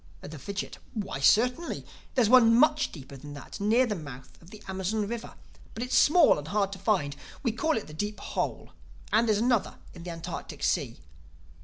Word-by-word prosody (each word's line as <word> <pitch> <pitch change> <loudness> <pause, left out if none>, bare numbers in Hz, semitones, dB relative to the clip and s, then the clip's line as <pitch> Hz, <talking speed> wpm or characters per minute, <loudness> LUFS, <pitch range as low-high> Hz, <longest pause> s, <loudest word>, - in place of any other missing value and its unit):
The 155 0 -9
Fidgit: 200 +6 -5 0.2
"Why, 200 -10 -3
certainly. 250 - +2 0.3
There's 245 -5 +4
one 230 -1 +7
much 300 +4 +4
deeper 140 -3 -10
than 145 +2 -10
that 145 - -9
near 225 +5 +3
the 225 - -2
mouth 135 -8 -9
of 170 - -16
the 215 +1 -12
Amazon 190 +3 -2
River. 235 +1 -6 0.4
But 225 - -3
it's 250 +1 -1
small 310 - +6
and 145 - -8
hard 200 +1 0
to 195 - -7
find. 175 -9 0 0.3
We 240 - +1
call 310 +7 0
it 220 - -4
'The 150 - -12
Deep 205 +6 -4
Hole.' - - -3 0.4
And 225 +2 +4
there's 215 -2 +3
another 235 0 +1 0.2
in 175 - -11
the 175 - -7
Antarctic 165 -1 -7
Sea." - - 0
210 Hz, 190 wpm, -28 LUFS, 165-235 Hz, 0.4 s, one